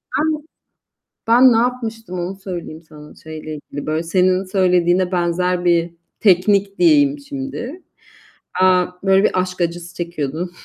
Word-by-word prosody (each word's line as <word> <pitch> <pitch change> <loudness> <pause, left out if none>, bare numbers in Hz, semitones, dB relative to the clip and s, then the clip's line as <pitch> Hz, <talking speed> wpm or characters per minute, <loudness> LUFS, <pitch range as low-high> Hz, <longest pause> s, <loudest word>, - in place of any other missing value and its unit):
Ben 305 0 0 0.8
ben 245 +3 +6
ne 225 - +3
yapmıştım 225 -5 -2
onu 180 +2 -4
söyleyeyim 175 -4 -7
sana, 150 -1 -14
şeyle 155 -1 -8
ilgili 145 -1 -8
böyle, 155 +1 -1
senin 185 +2 +1
söylediğine 180 -1 +2
benzer 180 +1 0
bir 170 -1 +1 0.3
teknik 200 0 +3
diyeyim 295 -4 +4
şimdi. 275 +2 -7 0.8
Eee, 185 -1 +4 0.2
böyle 195 +1 +4
bir 185 - +2
aşk 180 0 -4
acısı 175 +1 -3
çekiyordum 170 -1 -4
185 Hz, 130 wpm, -19 LUFS, 170-225 Hz, 0.8 s, ben